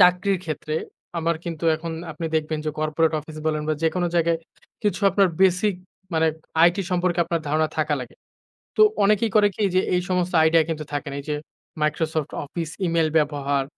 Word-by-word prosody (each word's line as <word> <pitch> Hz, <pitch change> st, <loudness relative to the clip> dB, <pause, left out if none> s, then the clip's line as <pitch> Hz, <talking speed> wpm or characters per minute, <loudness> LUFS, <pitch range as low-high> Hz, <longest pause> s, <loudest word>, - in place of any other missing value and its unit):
চাকরির 180 Hz, +2 st, +4 dB
ক্ষেত্রে, 155 Hz, -1 st, -4 dB, 0.4 s
আমার 165 Hz, 0 st, 0 dB
কিন্তু 165 Hz, -1 st, -5 dB
এখন 165 Hz, +1 st, -5 dB, 0.2 s
আপনি 165 Hz, +2 st, -4 dB
দেখবেন 155 Hz, 0 st, -1 dB
যে 155 Hz, -, 0 dB
কর্পোরেট 155 Hz, +1 st, +1 dB
অফিস 155 Hz, +1 st, -11 dB
বলেন 155 Hz, -1 st, 0 dB
বা 155 Hz, -, +2 dB
যেকোনো 175 Hz, +2 st, +1 dB
জায়গায় 170 Hz, -1 st, +2 dB, 0.4 s
কিছু 205 Hz, -3 st, 0 dB
আপনার 195 Hz, -2 st, +4 dB
বেসিক 190 Hz, +2 st, +4 dB, 0.4 s
মানে 160 Hz, 0 st, +3 dB, 0.4 s
আইটি 175 Hz, +3 st, +5 dB
সম্পর্কে 180 Hz, -1 st, +1 dB
আপনার 170 Hz, -1 st, -1 dB
ধারণা 155 Hz, +1 st, +2 dB
থাকা 150 Hz, -1 st, +2 dB
লাগে। 125 Hz, -, -9 dB, 0.6 s
তো -, -, +5 dB, 0.2 s
অনেকেই 210 Hz, +1 st, +3 dB
করে 205 Hz, -1 st, +6 dB
কি 215 Hz, -, -1 dB
যে 185 Hz, -, +5 dB
এই 180 Hz, -, +2 dB
সমস্ত 180 Hz, 0 st, 0 dB
আইডিয়া 160 Hz, 0 st, +5 dB
কিন্তু 155 Hz, -2 st, -2 dB
থাকে 145 Hz, 0 st, -2 dB
না 140 Hz, -, -4 dB
এই -, -, -19 dB
যে 150 Hz, -, 0 dB, 0.4 s
Microsoft 155 Hz, 0 st, 0 dB
Office, 165 Hz, +2 st, -5 dB
ইমেইল 165 Hz, -1 st, +2 dB
ব্যবহার 145 Hz, -2 st, +1 dB
165 Hz, 180 wpm, -23 LUFS, 155-180 Hz, 0.6 s, করে